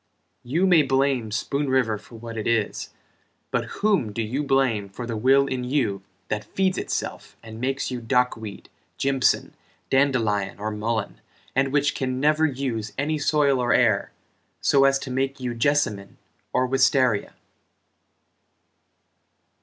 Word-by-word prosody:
You 160 +10 0
may 175 -4 +6
blame 135 -4 +1
Spoon 140 +6 -2
River 120 -5 +1
for 115 - -15
what 115 0 -8
it 110 - -3
is, 115 -3 0 0.6
But - - 0
whom 200 - 0
do 115 +2 -2
you 125 +7 -2
blame 135 -8 +1
for 120 +5 -7
the 115 -1 -4
will 135 +5 +4
in 130 -2 -3
you 125 -7 0 0.3
That 105 0 -2
feeds 185 - 0
itself - - -4
and 110 0 -9
makes 135 +1 -1
you 125 -1 -4
dock 125 +2 +2
weed, 110 -3 -9 0.3
Jimpson, 135 -1 +1 0.4
dandelion 115 -8 +1
or 110 +1 -3
mullen 110 0 -3 0.3
And 135 +1 +2
which 145 0 +2
can 130 -2 -2
never 155 +2 +3
use 125 -6 -3
any 150 +3 -1
soil 145 -2 +2
or 120 -1 +2
air 115 -5 +2 0.5
So 135 -1 +4
as 135 0 +4
to 135 - -7
make 135 +1 -1
you 125 -2 -3
jessamine 115 -6 0 0.3
or 130 - +2
wistaria? 130 -4 +2
130 Hz, 145 wpm, -24 LUFS, 110-140 Hz, 0.6 s, may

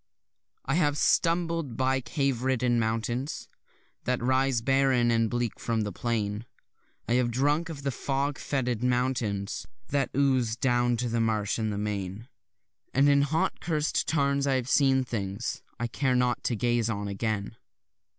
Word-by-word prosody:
I 135 - 0
have 150 -3 +2
stumbled 165 -7 +1
by 130 0 +1
cave 135 -3 -1
riddled 125 -1 +1
mountains 120 +4 -1 0.6
That 125 0 +1
rise 130 0 +2
barren 135 -2 +3
and 115 -1 +2
bleak 120 -1 -2
from 115 -2 -1
the 105 -1 -2
plain, 105 +1 -2 0.6
I 115 - +1
have 125 -1 +2
drunk 145 +7 +1
of 145 -4 -7
the 140 - 0
frog 140 +2 -2
foetid 125 -5 -1
fountains 125 -5 -1 0.2
That 140 -1 +1
ooze 130 -5 +2
down 120 -1 +1
to 120 +1 -1
the 115 0 0
marsh 110 -1 0
and 110 -1 -1
the 100 - -3
main; 105 +1 -4 0.7
And 135 +2 +5
in 140 0 +5
hot 155 +3 0
curs'd 155 -2 0
tarns 140 -2 +1
I 135 - +2
have 125 -2 -1
seen 135 -1 +4
things 105 -2 -4 0.2
I 120 - -1
care 130 +2 0
not 125 -1 +1
to 120 - +1
gaze 120 +1 +1
on 105 -2 -2
again. 100 +1 -2
125 Hz, 160 wpm, -28 LUFS, 115-135 Hz, 0.7 s, And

